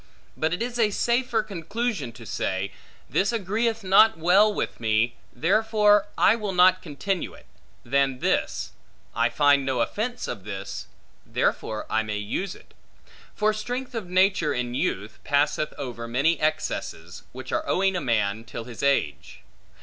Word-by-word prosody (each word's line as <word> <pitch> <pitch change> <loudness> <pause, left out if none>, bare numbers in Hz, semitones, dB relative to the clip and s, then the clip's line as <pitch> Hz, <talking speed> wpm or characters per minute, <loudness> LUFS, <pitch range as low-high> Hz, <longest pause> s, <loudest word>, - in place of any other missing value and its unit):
But 160 0 0
it 180 +6 -1
is 245 0 -4
a 220 -2 +4
safer 235 +1 +1
conclusion 200 - -3
to 115 +1 -12
say, 95 -1 -2 0.4
This 195 - +1
agreeth 225 +1 -1
not 195 +2 +6
well 185 +6 +5
with - - -3
me, 115 +1 +1 0.2
therefore, 210 - +3
I 210 - +5
will 210 -4 -3
not 185 +1 +5
continue 180 +4 -3
it; - - -17 0.4
than 135 +1 +1
this, - - -1 0.4
I 115 +1 +2
find 140 +3 +4
no 130 -2 -1
offence 220 - -2
of 100 - -5
this, 100 -1 -6 0.4
therefore 110 -1 -1
I 110 - +1
may 105 -1 -3
use 110 - -3
it. - - -19 0.6
For 215 +1 +2
strength 245 +5 -4
of 220 -6 -5
nature 185 -5 +3
in 120 0 -2
youth, 105 -3 -2
passeth 145 +1 +1
over 120 -4 -5
many 140 +8 +1
excesses, 95 - -2
which 130 +1 -8
are - - -1
owing 190 0 +2
a 180 - -1
man 110 -4 0
till 115 0 -7
his 120 0 -9
age. 135 - 0
160 Hz, 155 wpm, -25 LUFS, -, 0.6 s, not